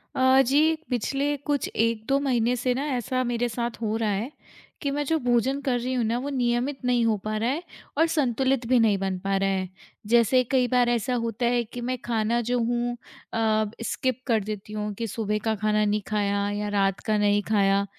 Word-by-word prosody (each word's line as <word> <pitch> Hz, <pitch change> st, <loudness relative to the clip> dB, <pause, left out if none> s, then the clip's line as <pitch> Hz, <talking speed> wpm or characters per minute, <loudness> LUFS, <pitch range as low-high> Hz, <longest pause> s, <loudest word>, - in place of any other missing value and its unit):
अ, 260 Hz, +1 st, +5 dB
जी 305 Hz, +5 st, +3 dB
पिछले 275 Hz, +4 st, 0 dB
कुछ 285 Hz, -2 st, +1 dB
1-2 230 Hz, +4 st, +1 dB
महीने 250 Hz, -3 st, +1 dB
से 250 Hz, +1 st, 0 dB
ना 270 Hz, +3 st, -2 dB
ऐसा 255 Hz, +2 st, -1 dB
मेरे 240 Hz, 0 st, 0 dB
साथ 235 Hz, +1 st, -4 dB
हो 215 Hz, -1 st, -1 dB
रहा 225 Hz, -2 st, 0 dB
है, 215 Hz, +7 st, -2 dB, 0.5 s
कि 280 Hz, -, -1 dB
मैं 290 Hz, +1 st, -1 dB
जो 320 Hz, +3 st, +1 dB
भोजन 245 Hz, +3 st, +2 dB
कर 250 Hz, -3 st, +1 dB
रही 250 Hz, +2 st, -2 dB
हूँ 250 Hz, -2 st, +1 dB
ना 230 Hz, +2 st, 0 dB
वो 275 Hz, +3 st, -4 dB
नियमित 250 Hz, +1 st, 0 dB
नहीं 245 Hz, -1 st, +2 dB
हो 225 Hz, -1 st, +3 dB
पा 215 Hz, -, -2 dB
रहा 225 Hz, +3 st, 0 dB
है, 305 Hz, +7 st, -2 dB, 0.3 s
और 325 Hz, +2 st, +4 dB
संतुलित 265 Hz, -4 st, +1 dB
भी 255 Hz, 0 st, +4 dB
नहीं 215 Hz, -3 st, +3 dB
बन 190 Hz, -1 st, -2 dB
पा 195 Hz, 0 st, 0 dB
रहा 195 Hz, 0 st, +1 dB
है। 190 Hz, -1 st, -1 dB, 0.4 s
जैसे 235 Hz, +3 st, +4 dB
कई 255 Hz, -2 st, +3 dB
बार 245 Hz, -1 st, +3 dB
ऐसा 240 Hz, +1 st, 0 dB
होता 230 Hz, +1 st, -2 dB
है 240 Hz, 0 st, +2 dB
कि 240 Hz, +2 st, -8 dB
मैं 255 Hz, +1 st, -2 dB
खाना 230 Hz, 0 st, +1 dB
जो 250 Hz, -, +2 dB
हूँ 240 Hz, +1 st, 0 dB, 0.4 s
अ, 220 Hz, -1 st, +2 dB, 0.2 s
स्किप 255 Hz, +1 st, -1 dB
कर 230 Hz, -3 st, +3 dB
देती 210 Hz, 0 st, -6 dB
हूँ, 210 Hz, 0 st, -3 dB
कि 230 Hz, +3 st, -4 dB
सुबह 210 Hz, 0 st, -2 dB
का 220 Hz, -, +1 dB
खाना 215 Hz, 0 st, +1 dB
नहीं 210 Hz, 0 st, +1 dB
खाया 200 Hz, -1 st, 0 dB
या 205 Hz, 0 st, -2 dB
रात 195 Hz, -2 st, +1 dB
का 215 Hz, -1 st, +2 dB
नहीं 205 Hz, 0 st, +3 dB
खाया 200 Hz, -2 st, +3 dB
235 Hz, 215 wpm, -25 LUFS, 215-255 Hz, 0.5 s, अ